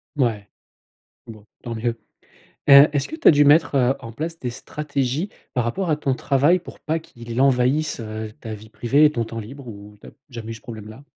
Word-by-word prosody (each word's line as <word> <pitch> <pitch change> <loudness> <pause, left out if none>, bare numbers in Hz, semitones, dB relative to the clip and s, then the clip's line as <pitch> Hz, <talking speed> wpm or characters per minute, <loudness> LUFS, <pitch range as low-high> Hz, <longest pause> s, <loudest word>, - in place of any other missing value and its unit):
Mouais. 115 -7 0 0.8
Bon, 110 -3 -12 0.2
tant 115 - -4
mieux. 115 +1 -2 0.7
Heu, 140 +1 +9
est-ce 140 -2 -1
que 315 - -6
tu 330 - -6
as - - +11
dû 145 -2 +5
mettre 140 -3 +4
en 115 - -9
place 165 +7 -5
des 125 - -4
stratégies 140 - -3 0.3
par 125 - +1
rapport 175 +11 -2
à 155 - +2
ton 140 -3 -1
travail 140 +7 +2
pour - - -12
pas 160 +2 -1
qu'il 120 -6 -7
envahisse, 135 +2 +2
heu, 110 -1 -6
ta 110 -1 -6
vie 105 +1 -12
privée 130 +7 +2
et 150 - +1
ton 115 -5 -1
temps 115 0 -6
libre 130 +5 -10
ou 105 -1 -11
tu - - -14
as - - -11 0.2
jamais 115 -2 -7
eu - - -6
ce 110 - -12
problème-là? 110 +1 -10
125 Hz, 210 wpm, -22 LUFS, 115-145 Hz, 0.8 s, as